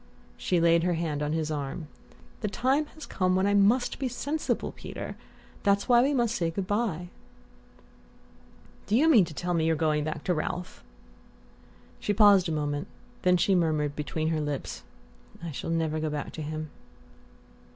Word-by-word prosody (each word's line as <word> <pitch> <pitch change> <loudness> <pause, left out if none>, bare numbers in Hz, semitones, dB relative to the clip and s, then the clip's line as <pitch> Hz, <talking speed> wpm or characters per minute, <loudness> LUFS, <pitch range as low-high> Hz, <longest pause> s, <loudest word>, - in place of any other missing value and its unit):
She 180 - 0
laid 170 0 +4
her 175 0 +1
hand 160 -3 -2
on 150 +1 -1
his 160 -1 -1
arm. 145 +2 -4 0.5
"The 210 - -2
time 260 +8 +1
has 310 - -9
come 185 -1 0
when 190 +1 +2
I 205 - +2
must 210 +5 +3
be 265 - 0
sensible, 285 +5 -2
Peter; - - -7 0.5
that's 200 -1 +2
why 240 -2 +6
we 270 +3 +2
must 240 -5 +1
say 170 -6 0
good 185 +3 -3
bye." 195 -5 -1 1.8
"Do 210 - +2
you 295 +7 +4
mean 235 - +6
to 165 - -9
tell 175 +3 -2
me 160 -1 +1
you're 165 - +3
going 155 -1 +1
back 155 0 -4
to 180 - +1
Ralph?" 175 - -4 1.2
She 205 - 0
paused 200 -4 +6
a - - -1
moment; 145 -1 -2 0.3
then 180 -1 +4
she 195 +3 +2
murmured 155 -5 +1
between 155 +2 -2
her 160 -1 0
lips: 145 -2 -4 0.6
"I 170 - -4
shall 135 - -5
never 160 -1 0
go 155 0 -1
back 150 -1 -4
to 160 - -7
him." 155 0 -5
170 Hz, 175 wpm, -28 LUFS, 155-205 Hz, 1.8 s, why